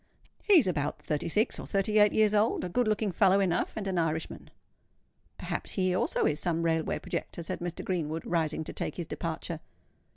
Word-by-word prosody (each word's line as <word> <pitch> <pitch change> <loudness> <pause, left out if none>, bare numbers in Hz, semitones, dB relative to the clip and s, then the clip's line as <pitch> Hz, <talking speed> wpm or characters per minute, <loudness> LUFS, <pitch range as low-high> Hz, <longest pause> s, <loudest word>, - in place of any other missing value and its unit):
He 405 -3 +6
is 300 - +5
about 150 -5 -1
thirty 150 0 -2
six 210 +6 +1
or - - -7
thirty 210 +2 +2
eight 210 -1 +6
years 215 -1 +3
old, 215 +2 +2
a 180 - -3
good 245 +6 +1
looking 215 -1 +1
fellow 195 +2 +4
enough, 185 -3 0
and 210 - -4
an 185 -2 0
Irishman." 160 -1 -2 0.9
"Perhaps - - -4
he 185 -2 +1
also 185 - +1
is 150 0 +2
some 170 0 0
railway 160 -1 0
projector," 170 - -5
said - - -4
Mr. 175 -1 -5
Greenwood, 165 -3 -2
rising 160 -2 0
to 160 - -8
take - - -4
his 175 - -3
departure. 165 0 -4
175 Hz, 195 wpm, -29 LUFS, 160-205 Hz, 0.9 s, He